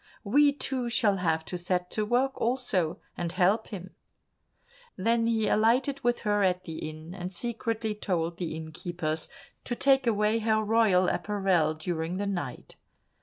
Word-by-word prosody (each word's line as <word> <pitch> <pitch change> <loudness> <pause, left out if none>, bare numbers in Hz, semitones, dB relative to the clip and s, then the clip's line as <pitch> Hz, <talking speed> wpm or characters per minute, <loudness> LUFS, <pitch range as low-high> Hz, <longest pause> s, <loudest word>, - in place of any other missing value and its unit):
We 285 +7 +5
two 265 -3 -2
shall 220 -4 +2
have 160 -3 0
to 180 - -5
set 180 0 -1
to 215 -1 -1
work 255 +4 +2
also, 235 -9 0 0.2
and 170 -1 -3
help 195 +5 +2
him." 185 -3 -8 1.0
Then 230 +4 +2
he 225 -2 +1
alighted 250 +6 +2
with 240 0 +1
her 205 -1 +1
at 185 -1 +2
the 160 -2 -6
inn, 155 +2 -10
and 180 -1 -5
secretly 225 +1 -2
told 175 -5 -2
the 170 -3 -3
innkeepers 160 0 -4 0.3
to 240 - -3
take 270 0 +3
away 215 0 +2
her 220 -1 +2
royal 210 -4 +3
apparel 180 -5 +1
during 160 +2 -3
the 205 - -1
night. 175 -11 -5
200 Hz, 155 wpm, -28 LUFS, 175-230 Hz, 1.0 s, We